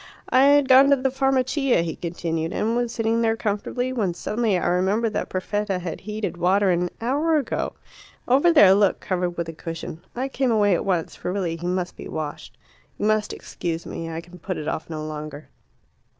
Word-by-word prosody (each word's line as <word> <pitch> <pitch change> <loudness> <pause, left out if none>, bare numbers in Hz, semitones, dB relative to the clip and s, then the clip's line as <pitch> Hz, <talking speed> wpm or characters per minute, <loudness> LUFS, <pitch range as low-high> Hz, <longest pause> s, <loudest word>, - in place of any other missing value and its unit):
"I 260 +1 +5
had 285 -1 +5
gone 265 +1 +7
to 280 - +6
the 265 0 -1
Farmacia," 270 - +1
he 165 -2 -4
continued, 165 -1 -3
"and 225 +2 0
was 240 -1 0
sitting 225 0 0
there 225 -1 +1
comfortably, 235 +4 -2
when 200 -8 -1
suddenly 215 -1 0
I - - -2
remembered 200 +5 +1
that - - -2
Perfetta 200 +1 -2
had 175 -2 -5
heated 210 -2 -4
water 190 +2 +3
an 175 0 +1
hour 290 +7 +1
ago 275 -6 -2 0.5
over 280 +8 +5
there, 205 - +7
look, 200 -1 +3
covered 180 -2 -2
with 170 -1 -2
a 165 - -6
cushion. 165 0 -7
I 255 +2 -1
came 270 -1 0
away 205 -3 +3
at 175 - 0
once, 180 -4 -1
for 180 - -4
really 180 -4 -1
he 170 +1 -5
must 180 0 -2
be - - -9
washed. 155 -2 -6 0.4
You - - -2
must 215 -1 +1
excuse 170 -1 -5
me. 165 0 -5
I 165 0 -4
can 175 +1 -15
put 185 +1 -4
it 150 - -5
off 160 - -3
no 155 -1 -5
longer." 150 -2 -7
200 Hz, 200 wpm, -23 LUFS, 170-240 Hz, 0.5 s, gone